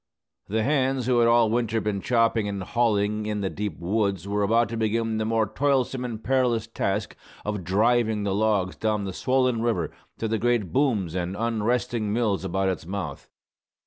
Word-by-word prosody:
The 110 +2 0
hands 135 -2 +1
who 125 -1 +3
had 115 - +5
all 115 -2 +4
winter 115 -1 +1
been 105 -2 -2
chopping 115 -2 +2
and 100 -2 -3
hauling 105 -1 0
in 105 -1 -2
the 95 - -2
deep 105 -5 -4
woods 100 0 -1
were 105 +1 0
about 115 +3 +3
to 115 - -4
begin 110 0 0
the 110 - 0
more 110 0 +2
toilsome 130 +3 0
and 115 -3 -5
perilous 125 -3 +1
task 105 -2 -2 0.3
of 105 -2 -3
"driving" 110 +3 +2
the 100 -1 0
logs 100 -3 +1
down 110 -2 -1
the 95 - -4
swollen 130 +1 +1
river 110 -9 0 0.3
to 115 - -2
the 110 0 -1
great 120 -6 0
booms 115 - +1
and 90 +1 -2
unresting 115 -1 0
mills 105 -4 0
about 95 +1 0
its 90 -3 -4
mouth. 90 -7 -5
110 Hz, 180 wpm, -25 LUFS, 100-120 Hz, 0.3 s, had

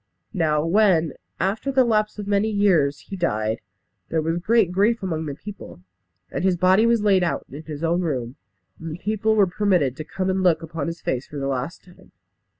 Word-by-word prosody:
Now 155 -3 +1
when, 170 -4 +3 0.3
after 205 +9 -1
the 260 -1 +4
lapse 215 -3 +1
of 205 - -5
many 205 +2 +1
years, 180 -10 +2
he 200 - -8
died, 110 - -1 0.5
there 165 - 0
was 165 +2 -1
great 215 0 +2
grief 210 +4 +2
among 160 -4 -2
the 140 - -4
people, 200 - -10 0.5
and - - -3
his 185 -2 +2
body 185 +5 +4
was 230 -2 +2
laid 195 -3 +4
out 175 - -1
in 145 +3 -7
his 155 0 -7
own 170 +2 +1
room, 130 -7 -3 0.4
and 165 -1 -6
the - - -6
people 215 +3 0
were 205 -2 +5
permitted 180 -8 +1
to 155 - -5
come 185 +4 -2
and 190 0 0
look 170 -3 +3
upon 160 -3 -4
his 170 0 -5
face 130 0 -2
for 150 - -8
the 135 - -3
last 135 +4 -3
time. 180 -1 -19
175 Hz, 205 wpm, -23 LUFS, 155-205 Hz, 0.5 s, were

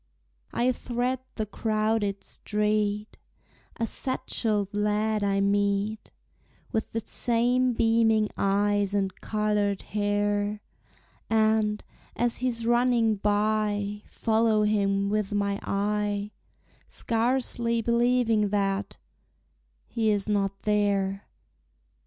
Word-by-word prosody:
I 250 +2 +2
thread 245 +1 -2 0.2
the 215 - -2
crowded 215 -1 -1
street; 210 0 -1 0.6
A 230 - 0
satchelled 215 -4 -1
lad 210 +1 0
I 195 0 +1
meet, 200 +1 0 0.6
With 220 - -2
the 225 - -2
same 245 +1 +2
beaming 225 -2 +3
eyes 205 0 +1
and 195 -2 0
colored 210 -2 0
hair; 205 0 -1 0.7
And, 220 -1 +2 0.3
as 240 0 0
he's 240 -2 -2
running 240 -2 +3
by, 210 0 0
Follow 220 -1 +1
him 200 -1 +1
with 210 -1 -1
my 200 0 0
eye, 205 0 -1 0.6
Scarcely 235 0 0
believing 235 -3 +2
that 195 -1 -1 0.9
he 225 -2 0
is 205 -1 +1
not 195 -2 -1
there! 200 -2 0
210 Hz, 95 wpm, -27 LUFS, 205-225 Hz, 0.9 s, beaming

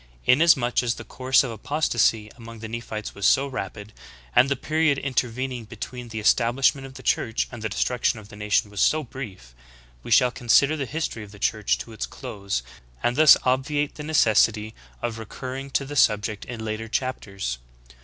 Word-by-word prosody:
Inasmuch 130 -3 +4
as 120 -1 -1
the - - -8
course 130 +1 +2
of 130 - -4
apostasy 115 -3 0
among 115 -1 -11
the 110 0 -7
Nephites 110 -2 -6
was 100 -1 +1
so 135 - +4
rapid, 110 -5 -6 0.4
and 130 +2 +6
the 140 - +1
period 155 +1 +1
intervening 130 -2 -2
between 120 +2 -7
the 110 -1 -5
establishment 130 +5 +2
of 130 - -14
the - - -11
Church 115 0 0
and 120 -3 -8
the 110 - -2
destruction 120 +3 0
of 105 -1 -12
the - - -12
nation 105 0 0
was 100 -2 -3
so 155 0 +3
brief, 105 - -9 0.5
we - - -10
shall 125 +2 +5
consider 135 +5 +3
the 140 -4 -3
history 150 -7 -3
of 105 - -12
the 100 - -13
Church 105 +1 +1
to 115 - -9
its 110 - -4
close, 100 - -4 0.4
and 120 - +1
thus 155 0 +8
obviate 140 +3 0
the - - -9
necessity 110 -7 +2 0.3
of 115 -1 -3
recur 130 +4 -7
ring 135 +1 -6
to 135 +1 0
the 145 +2 -7
subject 105 -4 +2
in 115 -2 -6
later 110 +1 -4
chapters. 100 - -3
120 Hz, 185 wpm, -24 LUFS, 110-135 Hz, 0.5 s, thus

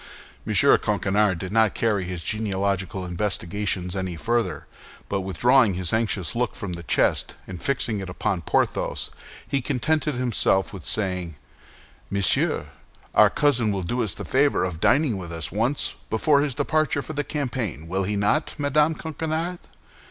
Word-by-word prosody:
M. - - -1
Coquenard 100 -1 +3
did 90 +2 -6
not 110 -1 +3
carry 105 -5 +1
his 90 -2 -5
genealogical 100 -3 -2
investigations 90 0 -2
any 95 -2 -2
further; 115 +6 -1 0.4
but 100 -1 -1
withdrawing 115 +3 +3
his 90 0 -1
anxious 110 -6 0
look 120 +1 -1
from 100 -6 -5
the 85 - -6
chest 85 - +1
and 90 -2 -8
fixing 120 -6 0
it 95 -1 -6
upon 90 0 -1
Porthos, - - -1 0.4
he 140 0 0
contented 150 +3 0
himself 120 -6 +1
with 95 -5 -8
saying, 90 -5 -1 0.7
"Monsieur 100 -1 +2 0.4
our - - +7
cousin 125 -7 +2
will 95 -2 -2
do 120 +8 -1
us 105 - -2
the - - -6
favor 140 +2 +2
of 90 -3 -3
dining 125 - +3
with 85 -2 -7
us 85 -1 -4
once 115 +9 0 0.2
before 140 +6 +3
his 145 -4 -1
departure 155 -1 0
for 155 - -6
the 145 0 -1
campaign, 120 - -3
will 95 +3 -1
he 100 +2 -1
not, 105 +10 +1
Madame 150 +2 +2
Coquenard?" 160 +3 -3
105 Hz, 155 wpm, -24 LUFS, 95-135 Hz, 0.7 s, our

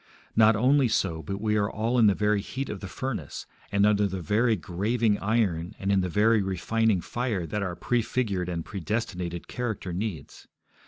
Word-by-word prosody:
Not 110 0 +6
only 130 +4 +4
so, 85 -7 0
but 100 +4 -5
we 105 0 0
are 100 -1 +1
all 115 +4 0
in 110 - +6
the 100 - +4
very 105 -1 +1
heat 135 +6 -5
of 105 - -5
the 95 - -7
furnace, 130 +5 -5 0.3
and 100 0 +3
under 105 -1 +3
the 95 -1 -4
very 110 +6 +2
graving 105 +5 0
iron 100 -4 0
and 100 +1 -1
in 100 -1 +3
the 90 - -2
very 105 +4 +3
refining 95 +2 +1
fire 110 -2 -2
that 105 +5 -3
our 90 -3 -3
prefigured 110 -4 -1
and 85 -2 -3
predestinated 90 -3 -3
character 110 -7 -4
needs. 90 -6 -5
105 Hz, 180 wpm, -27 LUFS, 95-115 Hz, 0.3 s, Not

